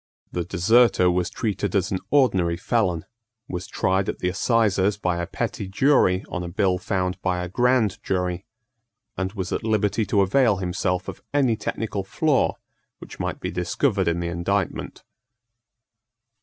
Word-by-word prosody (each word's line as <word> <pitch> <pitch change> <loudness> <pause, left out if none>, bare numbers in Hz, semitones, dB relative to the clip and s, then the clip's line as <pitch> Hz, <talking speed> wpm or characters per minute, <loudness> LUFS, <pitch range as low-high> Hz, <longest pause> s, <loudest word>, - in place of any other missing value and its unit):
The 90 - -2
deserter 95 +2 +4
was 90 0 0
treated 100 -3 -2
as 95 -1 +1
an 95 - 0
ordinary 95 -12 +3
felon, 95 -9 0 0.4
was 90 +1 -5
tried 95 +1 0
at - - -3
the 90 - -1
assizes 105 -1 +2
by 90 -4 -1
a 85 - -3
petty 100 - -3
jury 95 -3 +3
on 90 - -4
a 90 - -4
bill 95 0 +1
found 90 -1 -2
by 90 -2 -1
a - - -4
grand 120 0 +1
jury, 90 -1 -2 0.7
and 95 +1 -3
was 95 -4 -4
at - - -2
liberty 110 -1 +1
to 100 +1 +3
avail 110 +3 +3
himself 90 0 -2
of - - -7
any 130 -5 +3
technical 105 -2 -3
flaw 145 - +1 0.4
which - - -12
might - - -3
be - - -4
discovered - - 0
in 85 +1 +1
the 85 - -2
indictment. 90 +3 -2
95 Hz, 155 wpm, -24 LUFS, 90-110 Hz, 0.7 s, deserter